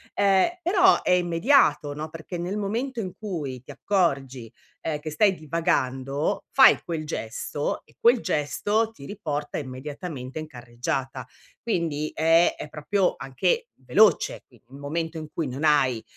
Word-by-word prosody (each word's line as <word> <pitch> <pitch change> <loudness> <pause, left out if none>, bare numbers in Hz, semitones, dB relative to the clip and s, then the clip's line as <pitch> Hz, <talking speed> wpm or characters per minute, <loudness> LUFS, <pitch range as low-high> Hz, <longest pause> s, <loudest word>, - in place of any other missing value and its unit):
ehm, 195 -2 +4 0.2
però 375 +1 +5
è - - +1
immediato, 175 - +3
no, 155 +2 -6
perché 165 +2 -7
nel 185 +4 -3
momento 230 +5 -2
in 185 -4 -4
cui 155 - -5
ti - - -25
accorgi, 135 - -1 0.3
ehm, 150 -2 -2
che 155 +1 -6
stai 195 +4 +3
divagando 145 0 -1
fai 265 - +7
quel 160 -3 -4
gesto 145 +3 -3
e - - -25
quel 235 0 +4
gesto 205 +8 0
ti 140 -11 -13
riporta 150 -7 -4
immediatamente 140 +1 -7
in 155 - -6
carreggiata. 130 0 -4 0.4
Quindi 160 -8 -2
è 165 +2 +4
è 150 - -7
proprio 180 +6 0
anche 460 - -1
veloce, 210 -7 +3
qui 120 -4 -22
il 135 +2 -13
momento 160 +3 -3
in 155 - -7
cui 160 -2 -2
non 130 +4 -5
hai, 130 -6 +3
155 Hz, 150 wpm, -25 LUFS, 140-195 Hz, 0.4 s, fai